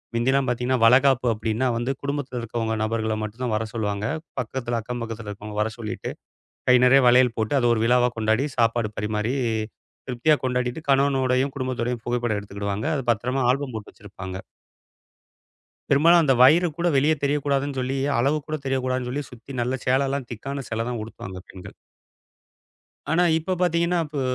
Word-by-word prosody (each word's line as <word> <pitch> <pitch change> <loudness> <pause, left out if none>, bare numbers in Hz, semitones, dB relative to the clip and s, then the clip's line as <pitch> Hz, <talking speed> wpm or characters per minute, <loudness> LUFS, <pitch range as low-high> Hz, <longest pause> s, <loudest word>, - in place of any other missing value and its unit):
மிந்திலாம் 130 +3 +2
பாத்தீங்கன்னா, 125 +1 0
வளகாப்பு 125 +1 +5
அப்டின்னா 110 +3 -1
வந்து 120 +3 -1
குடும்பத்துல 140 -3 -3
இருக்கவங்க 115 -1 -2
நபர்களை 110 0 -1
மட்டும்தான் 115 +2 -3
வரச் 110 +1 -3
சொல்லுவாங்க. 105 -2 -2 0.4
பக்கத்துல, 120 0 -3
அக்கம்பக்கத்தில் 115 -2 -6
இருக்கவங்க 105 +1 -7
வரச் 110 +2 -2
சொல்லிட்டு, 105 -2 -5 0.6
கை 125 - +8
நெறையா 135 +1 +6
வளையல் 125 -1 +5
போட்டு, 110 +5 -1
அத 120 - +2
ஒரு 110 - 0
விழாவா 125 +1 +4
கொண்டாடி, 110 +5 +1
சாப்பாடு 115 -1 +2
பரிமாறி, 105 +3 -1 0.7
திருப்தியா 130 +5 +2
கொண்டாடிட்டு 125 +3 -1
கணவனோடையும், 135 -1 +2
குடும்பத்தோடையும் 125 -3 -2
புகைப்படம் 120 -3 -1
எடுத்துக்கிடுவாங்க. 100 +4 -4
அது 135 - -2
பத்திரமா 125 +4 -1
ஆல்பம் 135 -2 -2
போட்டு 105 -2 -7
வச்சிருப்பாங்க. 95 -2 -8 1.5
பெரும்பாலும் 165 +5 +6
அந்த 135 - +4
வயிறு 160 +8 +6
கூட 175 +1 +1
வெளிய 145 +4 +4
தெரியக் 145 0 +1
கூடாதுன்னு 140 0 0
சொல்லி, 130 +2 -2 0.2
அளவு 140 +5 +2
கூடத் 155 -2 -5
தெரியக் 135 -1 -1
கூடாதுன்னு 130 -1 -1
சொல்லி 145 +3 -3
சுத்தி 125 +3 -12
நல்ல 125 +2 -1
சேல 135 +2 +2
எல்லாம் 140 -2 -3
திக்கான 135 +5 -5
சேலதான் 115 +1 -2
உடுத்துவாங்க 95 -4 -8
பெண்கள். 95 - -11 1.4
ஆனா 175 +2 +3
இப்ப 175 +4 -2
பாத்தீங்கன்னா, 170 0 +2
இப்போ 150 -2 -4
125 Hz, 155 wpm, -24 LUFS, 110-135 Hz, 1.5 s, கை